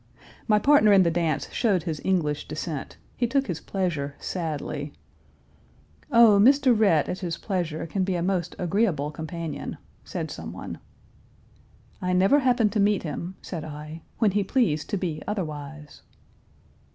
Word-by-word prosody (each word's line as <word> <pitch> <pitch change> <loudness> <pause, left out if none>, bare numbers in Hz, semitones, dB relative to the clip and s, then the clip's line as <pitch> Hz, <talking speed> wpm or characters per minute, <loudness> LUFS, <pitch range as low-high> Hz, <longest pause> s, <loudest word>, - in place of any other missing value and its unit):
My 210 -2 +5
partner 245 -2 +5
in 195 -1 +7
the 170 - +2
dance 165 -3 0
showed 200 -8 +1
his 160 -3 -4
English 155 -6 0
descent; 155 -1 -5 0.2
he 240 - +1
took 270 +3 +1
his 170 - -4
pleasure 160 -8 -2
sadly. 150 -4 -4 1.2
"Oh, 230 -3 +7
Mr. 265 +1 +5
Rhett, 195 -9 +3
at 185 - -3
his 175 -3 -3
pleasure, 170 -6 -3
can 185 +4 -1
be 185 0 -1
a 170 - -1
most 180 -2 -1
agreeable 175 -5 0
companion!" 160 -1 -5 0.3
said - - -5
someone. - - -7 1.2
"I 180 0 0
never 195 +10 +5
happened 245 -5 +2
to 215 - -1
meet 205 -1 +2
him," 170 +4 -5
said 165 -4 -5
I, 155 +1 -8 0.2
"when 220 -4 +3
he 205 +1 +1
pleased 190 - 0
to 205 - 0
be 165 -5 -3
otherwise." 150 -6 -5
180 Hz, 150 wpm, -25 LUFS, 155-205 Hz, 1.2 s, in